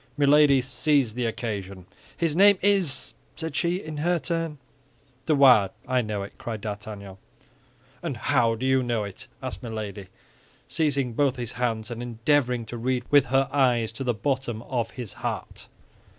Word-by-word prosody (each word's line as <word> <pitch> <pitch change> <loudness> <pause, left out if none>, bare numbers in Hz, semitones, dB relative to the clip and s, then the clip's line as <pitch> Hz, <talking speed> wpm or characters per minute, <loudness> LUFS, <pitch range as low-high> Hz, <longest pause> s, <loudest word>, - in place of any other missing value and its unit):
Milady 145 -2 +5
seized 135 -3 +1
the 125 -1 0
occasion. 100 -5 -5 0.3
"His 165 -3 0
name 200 +2 +7
is—" 195 -8 +1 0.2
said 160 -3 -5
she, 170 +2 +1
in 155 -5 -6
her 175 +4 +1
turn. 165 -1 -2 0.7
"De 155 - +4
Wardes; 125 -8 +6
I 130 -1 +2
know 105 -3 -3
it," 100 - -11
cried 115 -2 -5
D'Artagnan. 100 -2 -7 0.8
"And 155 -8 -4
how 115 -2 +2
do 120 +4 -4
you 130 0 +3
know 120 -3 -1
it?" 100 -2 -7 0.2
asked 95 - -4
Milady, 105 -4 -6 0.6
seizing 140 -6 0
both 135 +1 +2
his 120 -2 -4
hands, 115 -2 -2
and 120 0 -5
endeavoring 120 +1 +1
to 120 +2 -7
read 125 +1 -1
with 145 -2 +6
her 135 +1 +2
eyes 125 -5 +2
to 115 +4 -5
the 120 -3 0
bottom 130 -2 -2
of 120 -3 -2
his 120 -7 -7
heart. - - -4
125 Hz, 165 wpm, -26 LUFS, 110-145 Hz, 0.8 s, name